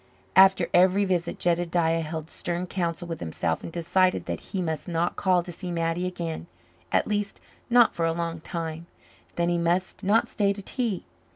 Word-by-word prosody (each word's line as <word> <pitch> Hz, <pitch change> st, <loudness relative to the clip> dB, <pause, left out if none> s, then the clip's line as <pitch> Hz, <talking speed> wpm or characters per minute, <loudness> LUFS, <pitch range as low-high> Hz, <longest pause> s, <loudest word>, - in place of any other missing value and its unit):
After 190 Hz, -2 st, +7 dB
every 190 Hz, +3 st, +5 dB
visit 175 Hz, -3 st, -1 dB
Jedediah 170 Hz, -1 st, +1 dB
held 160 Hz, 0 st, -5 dB
stern 175 Hz, +1 st, -3 dB
counsel 175 Hz, -1 st, -3 dB
with 165 Hz, -2 st, -5 dB
himself 80 Hz, 0 st, -2 dB
and -, -, -7 dB
decided 180 Hz, +2 st, +1 dB
that -, -, -3 dB
he 195 Hz, -, -5 dB
must 160 Hz, -2 st, -2 dB
not 170 Hz, 0 st, 0 dB
call 185 Hz, -2 st, +2 dB
to 175 Hz, -, -8 dB
see 180 Hz, +2 st, -7 dB
Mattie 165 Hz, +1 st, -1 dB
again 170 Hz, -2 st, -4 dB, 0.4 s
at -, -, +3 dB
least, 205 Hz, -1 st, -2 dB, 0.3 s
not 240 Hz, -1 st, +6 dB
for 165 Hz, -1 st, 0 dB
a -, -, +2 dB
long 165 Hz, 0 st, -3 dB
time; 165 Hz, 0 st, -5 dB, 0.5 s
then 170 Hz, 0 st, +1 dB
he 175 Hz, 0 st, +1 dB
must 175 Hz, +4 st, 0 dB
not 210 Hz, +4 st, +3 dB
stay 200 Hz, -2 st, +1 dB
to 200 Hz, -, -8 dB
tea. 230 Hz, -4 st, -2 dB
175 Hz, 180 wpm, -26 LUFS, 165-185 Hz, 0.5 s, After